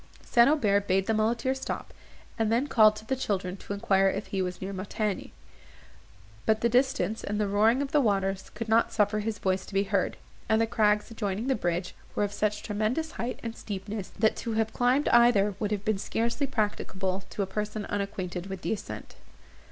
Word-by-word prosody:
St. 235 +1 +5
Aubert 205 -9 +2
bade 190 0 +2
the 225 - +1
muleteer 230 +4 +1
stop, 265 - -5 0.5
and 220 -1 +2
then 240 +4 +2
called 215 -6 +5
to 215 - -10
the 265 - 0
children 190 -7 -2
to - - -10
enquire 195 -2 +3
if 200 +2 -3
he 195 - -2
was 180 -1 -3
near 195 +1 -5
Montigny; 205 +1 -3 1.2
but 220 0 +3
the 235 - +3
distance, 250 -2 +1
and 210 +1 -2
the 210 - +1
roaring 220 +7 +3
of 275 - -5
the 295 - +4
waters, 195 -4 0
would 230 +1 -4
not 225 +1 +3
suffer 210 0 +2
his 215 0 -2
voice 190 -1 0
to 195 - -9
be 195 - +4
heard; 195 -2 0 0.3
and 220 0 +4
the 225 - +3
crags, 210 0 +2
adjoining 210 -1 -2
the 265 - +2
bridge, 175 -4 -2 0.2
were - - +1
of 205 0 -2
such 210 0 -1
tremendous 220 +10 -1
height 240 +2 -4
and 230 -1 -4
steepness, 205 0 -5
that 220 - +3
to 230 - -3
have 220 0 0
climbed 250 +4 +2
either 235 -4 +5
would 210 - -1
have 205 0 -2
been 215 -3 +1
scarcely 235 +7 -1
practicable 195 -5 -2
to 200 - -2
a - - -1
person 210 +2 -3
unacquainted 195 -3 -3
with 190 -1 -6
the - - 0
ascent. 215 - -7
210 Hz, 200 wpm, -28 LUFS, 195-230 Hz, 1.2 s, St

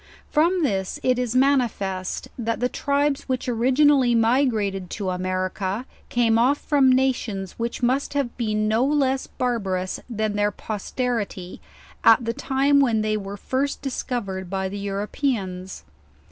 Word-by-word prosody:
From 340 +3 +3
this 190 -8 -1
it 255 -1 +2
is 250 -1 -2
manifest 235 -9 +1
that 230 -1 -2
the 245 - +2
tribes 280 +1 -1
which 255 -1 -1
origin 255 +5 +4
ally 255 -4 +3
migrated 225 -6 +1
to 195 -4 -3
America 185 +4 -2 0.2
came 230 -2 +3
off 265 +5 +3
from 280 -4 +3
nations 245 -7 0
which 235 +2 -3
must 265 +4 +1
have 275 -4 -1
been 215 -3 0
no 220 +3 +2
less 270 -2 +1
barbarous 195 -7 -2
than 215 -2 -1
their 205 0 +2
posterity, 210 -2 -4 0.4
at 230 +1 +6
the 230 - -1
time 280 +2 +2
when 235 -6 +3
they 215 0 0
were 200 -1 -5
first 270 +6 -2
discovered 200 -8 -3
by 190 0 -1
the 200 +2 -5
Europeans. 200 -2 -3
230 Hz, 145 wpm, -23 LUFS, 200-265 Hz, 0.4 s, at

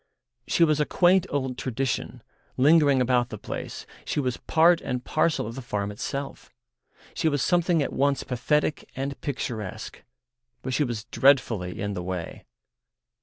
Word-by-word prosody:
She 170 - +3
was 155 -2 +3
a 150 - +2
quaint 185 +1 +3
old 130 -3 -2
tradition, 130 0 -3 0.3
lingering 145 -1 +5
about 125 -1 +2
the 110 - -6
place, - - -6 0.2
she - - -2
was 130 -3 -1
part 165 +1 +3
and 125 -1 -4
parcel 155 -4 +1
of 115 - -6
the 135 - -7
farm 105 -4 -3
itself, 135 +7 -5 0.6
she 160 - +1
was 145 -3 0
something 175 -3 +2
at - - -4
once 140 0 +1
pathetic 150 +4 -1
and 135 +1 -4
picturesque—but 120 0 -7
she 150 - +2
was 120 -5 -3
dreadfully 115 -11 +2
in 100 0 -2
the 90 - -4
way. 90 -2 -5
130 Hz, 150 wpm, -26 LUFS, 120-150 Hz, 0.6 s, lingering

